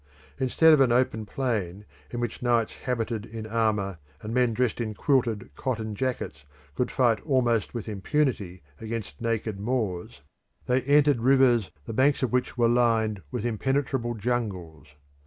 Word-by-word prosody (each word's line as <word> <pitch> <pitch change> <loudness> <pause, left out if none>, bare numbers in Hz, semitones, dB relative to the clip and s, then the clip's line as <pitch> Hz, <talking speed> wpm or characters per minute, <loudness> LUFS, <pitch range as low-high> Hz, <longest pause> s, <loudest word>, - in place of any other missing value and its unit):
Instead 155 +5 +5
of 150 - +5
an 130 -3 +4
open 120 -3 +1
plain 105 -6 -2 0.2
in 120 - -5
which 120 -2 -3
knights 120 -2 +1
habited 115 -3 -3
in 110 0 -7
armour 105 -5 0 0.2
and 110 +2 -4
men 125 -1 +3
dressed 120 0 0
in 110 -2 -3
quilted 120 -5 0
cotton 110 -4 -3
jackets 125 - -3 0.3
could 125 - -1
fight 120 -5 +2
almost 120 - +1
with 115 -2 -4
impunity 105 - -1 0.2
against 110 -10 -6
naked 110 -3 -2
Moors, 105 -6 -2 0.4
they 125 +1 +2
entered 145 -1 +4
rivers 125 -4 +4 0.2
the - - -5
banks 135 +4 +2
of 125 - 0
which 125 -1 -1
were 120 -1 +4
lined 115 -4 +2
with 115 +7 -4
impenetrable 125 +1 -1
jungles. 100 - -3
115 Hz, 150 wpm, -26 LUFS, 105-125 Hz, 0.4 s, Instead